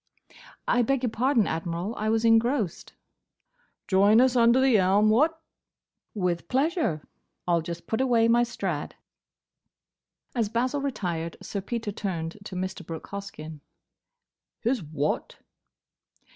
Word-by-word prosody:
"I 245 - +3
beg 265 +2 0
your 245 - 0
pardon, 245 -1 +2
Admiral; 170 +5 -3
I 215 +1 -1
was 225 +1 +1
engrossed." 225 - +1 0.9
"Join 200 +3 +5
us 255 0 +4
under 235 +1 +5
the 260 -5 +4
elm, 200 +3 +4
what?" 310 +8 +3 0.8
"With 180 -4 -1
pleasure. 275 - 0 0.4
I 175 - +2
'll 170 - +3
just 170 +1 -7
put 220 - -1
away 235 -3 +3
my 235 +1 +4
Strad." 240 - -3 1.4
As 230 -4 0
Basil 255 +5 0
retired 175 -12 -3
Sir 200 - -4
Peter 225 +1 -4
turned 180 -3 -4
to 190 - -7
Mr. 185 0 -4
Brooke 165 -1 -8
Hoskyn. 180 -6 -7 1.0
"His 240 0 0
what?" 150 -2 -3
215 Hz, 130 wpm, -26 LUFS, 180-245 Hz, 1.4 s, Join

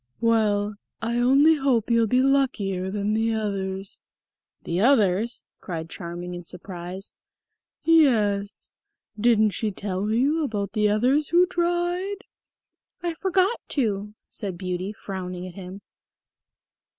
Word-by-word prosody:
"Well, 210 -3 +2 0.2
I 235 +1 -1
only 275 +6 +5
hope 250 -5 +1
you'll 230 -1 +4
be 250 +4 +3
luckier 220 -9 +1
than 205 +1 -1
the 225 +1 +1
others." 195 -2 -3 0.6
"The 170 +1 -2
others?" 225 -2 +2 0.2
cried 165 -3 -6
Charming 175 +1 -6
in 175 0 -7
surprise. 180 +2 -7 0.7
"Yes; 215 -11 +2 0.5
didn't 220 -2 +4
she 215 +2 -1
tell 200 0 -3
you 280 +8 +2
about 205 -7 -2
the 210 -1 +2
others 255 +8 +2
who 350 +2 +5
tried?" 355 +3 -1 0.8
"I 345 -1 -1
forgot 380 +5 +1 0.2
to," 210 -4 -1
said 195 -4 -5
Beauty, 185 +1 -3
frowning 185 -4 -6
at 185 - -8
him. 190 +1 -9
215 Hz, 120 wpm, -25 LUFS, 190-270 Hz, 0.8 s, only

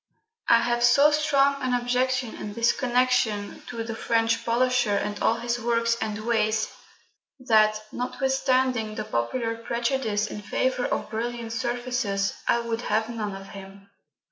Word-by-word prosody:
I 235 - +6
have 240 0 0
so 280 +5 +6
strong 280 -2 +2
an 255 -1 +1
objection 250 0 0
in 205 - -7
this 230 +2 +3
connection 245 -5 0
to 230 -2 -4
the 225 0 -5
French 225 0 0
polisher 245 -2 +2
and 205 +1 -2
all 225 - +3
his 235 +1 -2
works 230 0 +1
and 215 0 -3
ways, 220 -2 +1 0.7
that, 215 -4 +4
notwithstanding 255 -3 0
the 215 - -3
popular 225 - -2
prejudice 235 -2 -1
in 210 0 -6
favour 255 +4 -1
of - - -3
brilliant 230 0 -4
surfaces, 240 -4 -1
I 235 - +3
would 230 0 -3
have 220 -1 0
none 215 -4 -4
of 195 0 -10
him. 195 0 -12
235 Hz, 145 wpm, -25 LUFS, 215-250 Hz, 0.7 s, I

